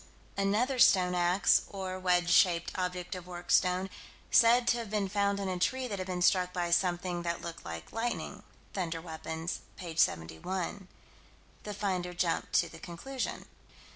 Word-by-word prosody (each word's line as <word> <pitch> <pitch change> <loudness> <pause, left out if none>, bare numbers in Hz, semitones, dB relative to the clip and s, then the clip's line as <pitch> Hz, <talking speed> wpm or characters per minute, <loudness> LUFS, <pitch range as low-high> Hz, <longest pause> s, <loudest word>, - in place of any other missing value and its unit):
Another 215 +7 +1
stone 180 -5 +5
ax 180 +2 +3
or 190 -2 -5
wedge 180 -1 +2
shaped 175 -1 +4
object 180 -1 -3
of 180 -1 -7
worked 175 -1 -6
stone 185 +1 +3 0.4
said 235 +1 +6
to 240 - +3
have 230 -3 -5
been 210 -2 0
found 200 0 0
in 200 - -2
a 185 -1 -2
tree 260 +7 0
that 200 -4 -4
had 185 - -4
been 180 -1 -2
struck 180 0 +3
by 175 -1 -1
something 175 0 +1
that 170 0 -3
looked 170 -1 -7
like 80 -1 -8
lightning. 230 +1 -3 0.3
(Thunder 170 -4 -2
Weapons, 160 0 -5 0.2
p. 170 -3 -7
71.) 170 - -1 0.8
The 210 -1 -5
finder 185 -3 -2
jumped 170 -1 0
to - - +4
the - - -12
conclusion. 255 +10 -5
180 Hz, 165 wpm, -31 LUFS, 175-200 Hz, 0.8 s, said